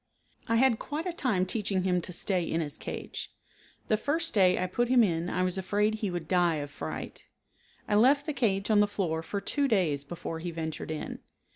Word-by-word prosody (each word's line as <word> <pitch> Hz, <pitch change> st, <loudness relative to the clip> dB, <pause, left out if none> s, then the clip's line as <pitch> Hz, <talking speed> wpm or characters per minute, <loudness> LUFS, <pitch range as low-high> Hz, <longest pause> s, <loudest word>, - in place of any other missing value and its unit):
I 230 Hz, -, +2 dB
had 235 Hz, -1 st, +4 dB
quite 305 Hz, +3 st, -4 dB
a 360 Hz, -, -2 dB
time 220 Hz, -, +1 dB
teaching 195 Hz, -2 st, -1 dB
him 180 Hz, -1 st, +1 dB
to 180 Hz, -, -7 dB
stay 180 Hz, +1 st, +1 dB
in 165 Hz, 0 st, -1 dB
his 150 Hz, -3 st, -2 dB
cage. -, -, -6 dB, 0.6 s
The 215 Hz, -, +3 dB
first 320 Hz, +7 st, -1 dB
day 185 Hz, -4 st, +4 dB
I 185 Hz, -, 0 dB
put 240 Hz, +7 st, 0 dB
him 250 Hz, -1 st, +5 dB
in 170 Hz, -3 st, 0 dB
I 185 Hz, -, 0 dB
was 185 Hz, +1 st, 0 dB
afraid 205 Hz, +3 st, +1 dB
he 215 Hz, -2 st, -2 dB
would 175 Hz, -3 st, -4 dB
die 175 Hz, -2 st, +3 dB
of 145 Hz, -1 st, -4 dB
fright. -, -, -6 dB, 0.6 s
I -, -, -1 dB
left 270 Hz, +7 st, +5 dB
the 305 Hz, -, -2 dB
cage 205 Hz, -5 st, +1 dB
on 210 Hz, -, +5 dB
the 205 Hz, -, +5 dB
floor 175 Hz, -6 st, -1 dB
for 200 Hz, +5 st, -3 dB
two 280 Hz, +8 st, 0 dB
days 170 Hz, -, +1 dB
before 165 Hz, +1 st, -6 dB
he 175 Hz, +2 st, -4 dB
ventured 160 Hz, -2 st, -5 dB
in. 155 Hz, -1 st, -4 dB
190 Hz, 215 wpm, -29 LUFS, 170-225 Hz, 0.6 s, him